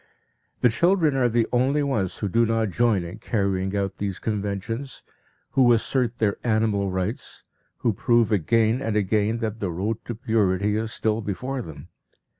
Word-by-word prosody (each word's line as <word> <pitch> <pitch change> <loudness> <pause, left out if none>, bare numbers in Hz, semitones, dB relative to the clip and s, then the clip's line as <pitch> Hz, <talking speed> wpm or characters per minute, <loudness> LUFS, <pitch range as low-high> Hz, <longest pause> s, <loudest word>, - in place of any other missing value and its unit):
The 125 - +5
children 165 - +2
are 125 -2 +3
the 115 0 +2
only 135 +4 +2
ones 110 -10 -1
who 105 - -2
do 115 +5 +2
not 115 -2 0
join 110 -2 +2
in 85 +1 -8
carrying 95 -2 -1
out 100 -1 -2
these 100 -2 -3
conventions, 105 +5 -4 0.5
who 125 -2 +5
assert 120 +1 0
their 105 -3 +1
animal 110 -4 +1
rights, 95 +5 -4 0.3
who 115 - 0
prove 115 +1 +2
again 110 +5 +2
and 115 -5 -2
again 105 +2 +1
that 110 0 -3
the 100 - -2
road 100 +6 -3
to 120 - -4
purity 105 -3 +1
is 110 +1 -2
still 110 0 -1
before 125 +6 -3
them. 80 -9 -10
110 Hz, 165 wpm, -24 LUFS, 100-120 Hz, 0.5 s, The